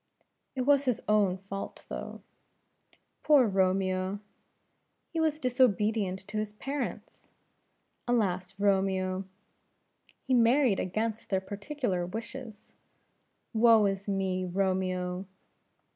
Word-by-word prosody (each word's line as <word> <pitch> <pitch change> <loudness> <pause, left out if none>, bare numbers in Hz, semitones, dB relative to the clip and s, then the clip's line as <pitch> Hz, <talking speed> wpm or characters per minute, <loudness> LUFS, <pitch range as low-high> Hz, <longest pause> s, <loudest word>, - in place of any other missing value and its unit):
"It 260 - -1
was 280 +2 +4
his 250 -4 +1
own 205 -3 +3
fault 195 +1 -7
though." - - -7 1.0
"Poor 290 -4 +5
Romeo!" 190 -1 +1 0.9
"He 330 - -1
was 310 -1 +1
disobedient 215 - +1
to 215 +2 -3
his 210 -1 -4
parents." 275 +5 -5 0.8
"Alas 195 -5 0
Romeo!" 190 -1 +1 1.0
"He 265 - 0
married 240 -2 +4
against 220 +4 -2
their 190 - +2
particular 205 0 -3
wishes." 225 +2 -8 0.8
"Woe 225 -1 +6
is 195 0 -2
me, 190 -2 -1
Romeo!" 185 0 -1
200 Hz, 100 wpm, -29 LUFS, 190-235 Hz, 1.0 s, Woe